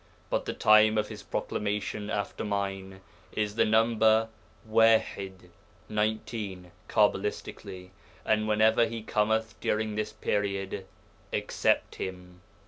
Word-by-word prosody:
But -, -, 0 dB
the -, -, -3 dB
time 110 Hz, 0 st, +5 dB
of 105 Hz, 0 st, 0 dB
his -, -, -8 dB
proclamation 105 Hz, 0 st, -3 dB
after 100 Hz, -2 st, -3 dB
mine 95 Hz, -2 st, -3 dB, 0.3 s
is 105 Hz, -1 st, -1 dB
the 115 Hz, -, +3 dB
number 110 Hz, 0 st, +3 dB, 0.4 s
Waḥid 105 Hz, -5 st, +2 dB, 0.4 s
(=19, 105 Hz, -4 st, -2 dB, 0.2 s
cabbalistically), 100 Hz, -2 st, -1 dB, 0.3 s
and 110 Hz, 0 st, +2 dB
whenever 110 Hz, +2 st, +4 dB
he 115 Hz, -1 st, -6 dB
cometh 110 Hz, +1 st, 0 dB
during 110 Hz, 0 st, -1 dB
this 105 Hz, 0 st, -2 dB
period, 100 Hz, -1 st, -2 dB, 0.4 s
accept -, -, 0 dB
him.' 90 Hz, -1 st, -7 dB
105 Hz, 110 wpm, -28 LUFS, 95-110 Hz, 0.4 s, time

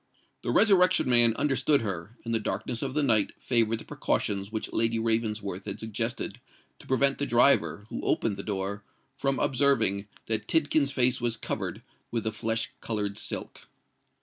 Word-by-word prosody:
The -, -, -4 dB
Resurrection 185 Hz, -7 st, +4 dB
Man 120 Hz, -2 st, +5 dB
understood 140 Hz, +1 st, +2 dB
her; 95 Hz, +1 st, -5 dB
and 115 Hz, -, -2 dB
the 115 Hz, -, +2 dB
darkness 110 Hz, +3 st, -3 dB
of 135 Hz, 0 st, -3 dB
the 150 Hz, -, +2 dB
night 110 Hz, -6 st, +2 dB
favoured 115 Hz, -2 st, +2 dB
the -, -, -11 dB
precautions 100 Hz, 0 st, -2 dB
which 110 Hz, -1 st, -4 dB
Lady 115 Hz, 0 st, +1 dB
Ravensworth 105 Hz, -4 st, -1 dB
had 100 Hz, -1 st, -5 dB
suggested 115 Hz, +2 st, -3 dB, 0.4 s
to -, -, -15 dB
prevent 140 Hz, +1 st, +2 dB
the 145 Hz, -, -1 dB
driver, 120 Hz, -4 st, +3 dB
who -, -, -5 dB
opened 110 Hz, -3 st, 0 dB
the -, -, -6 dB
door, 100 Hz, 0 st, -3 dB, 0.3 s
from 135 Hz, 0 st, -1 dB
observing 115 Hz, -7 st, +2 dB, 0.2 s
that 110 Hz, -1 st, -2 dB
Tidkins's 150 Hz, -3 st, +2 dB
face 125 Hz, -2 st, +2 dB
was 120 Hz, -1 st, 0 dB
covered -, -, -4 dB, 0.3 s
with 115 Hz, -2 st, -2 dB
the 110 Hz, -, -1 dB
flesh 115 Hz, +1 st, -2 dB
coloured 105 Hz, -3 st, -2 dB
silk. -, -, -4 dB
115 Hz, 165 wpm, -27 LUFS, 105-130 Hz, 0.4 s, Man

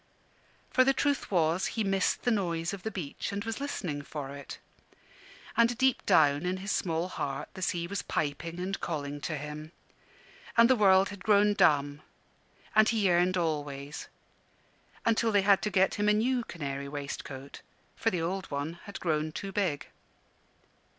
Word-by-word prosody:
For 255 Hz, -, +5 dB
the 270 Hz, +1 st, +3 dB
truth 285 Hz, 0 st, 0 dB
was, 170 Hz, -1 st, +2 dB
he 220 Hz, -, +2 dB
missed 195 Hz, -2 st, +1 dB
the 245 Hz, -, +2 dB
noise 170 Hz, -5 st, -1 dB
of 200 Hz, -, -6 dB
the 220 Hz, -, -3 dB
beach, 175 Hz, -9 st, -5 dB
and 200 Hz, +1 st, -3 dB
was 225 Hz, +2 st, -3 dB
listening 180 Hz, -, -3 dB
for 145 Hz, -1 st, -6 dB
it. 140 Hz, -, -8 dB, 1.0 s
And 235 Hz, 0 st, +3 dB
deep 260 Hz, -1 st, +2 dB
down 145 Hz, 0 st, +4 dB
in 180 Hz, +1 st, -1 dB
his 195 Hz, +2 st, -4 dB
small 165 Hz, 0 st, 0 dB
heart 140 Hz, -5 st, -4 dB
the 190 Hz, -, -9 dB
sea 170 Hz, -2 st, 0 dB
was 195 Hz, +2 st, -3 dB
piping 160 Hz, +3 st, -3 dB
and 190 Hz, +2 st, -3 dB
calling 145 Hz, -3 st, -4 dB
to 155 Hz, 0 st, -3 dB
him. 150 Hz, +2 st, -7 dB, 0.9 s
And 230 Hz, 0 st, +8 dB
the -, -, +6 dB
world 195 Hz, -3 st, +5 dB
had 200 Hz, -2 st, -9 dB
grown 210 Hz, -1 st, +4 dB
dumb; 145 Hz, -5 st, +3 dB, 0.7 s
and 215 Hz, 0 st, +6 dB
he 220 Hz, -3 st, +1 dB
yearned 180 Hz, 0 st, +3 dB
always: 145 Hz, -4 st, -3 dB, 1.0 s
until 230 Hz, 0 st, +2 dB
they 205 Hz, -2 st, +3 dB
had 200 Hz, -1 st, +5 dB
to 210 Hz, -, -1 dB
get 190 Hz, -1 st, +3 dB
him 210 Hz, 0 st, +1 dB
a -, -, +5 dB
new 240 Hz, +3 st, +1 dB
canary 140 Hz, -4 st, -5 dB
waistcoat, 140 Hz, -1 st, -7 dB, 0.3 s
for 225 Hz, -, +1 dB
the 175 Hz, -5 st, -2 dB
old 185 Hz, +2 st, -3 dB
one 145 Hz, +4 st, -4 dB
had 200 Hz, -, -7 dB
grown 155 Hz, -2 st, 0 dB
too 195 Hz, +5 st, -5 dB
big. 180 Hz, -9 st, -1 dB
180 Hz, 170 wpm, -30 LUFS, 150-205 Hz, 1.0 s, And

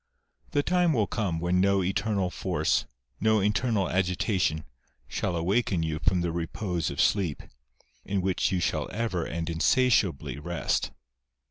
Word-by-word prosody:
The 145 Hz, -, +1 dB
time 180 Hz, -1 st, +2 dB
will 110 Hz, -6 st, +2 dB
come 95 Hz, -4 st, -2 dB
when 90 Hz, +2 st, +1 dB
no 100 Hz, 0 st, +3 dB
eternal 95 Hz, 0 st, 0 dB
force, -, -, 0 dB, 0.3 s
no 110 Hz, +1 st, +3 dB
internal 105 Hz, 0 st, +1 dB
agitation, 90 Hz, -3 st, 0 dB, 0.4 s
shall 90 Hz, -, -2 dB
awaken 90 Hz, +1 st, +1 dB
you 80 Hz, -1 st, -2 dB
from 90 Hz, -1 st, +2 dB
the 85 Hz, -1 st, -1 dB
repose 85 Hz, +1 st, -2 dB
of -, -, -6 dB
sleep, 90 Hz, -8 st, +1 dB, 0.6 s
in 100 Hz, +1 st, -1 dB
which 95 Hz, +2 st, 0 dB
you 95 Hz, -, +1 dB
shall -, -, -1 dB
ever 110 Hz, -7 st, -1 dB
and 80 Hz, 0 st, -4 dB
insatiably 85 Hz, -, +2 dB
rest. 85 Hz, +2 st, -1 dB
95 Hz, 140 wpm, -27 LUFS, 85-105 Hz, 0.6 s, no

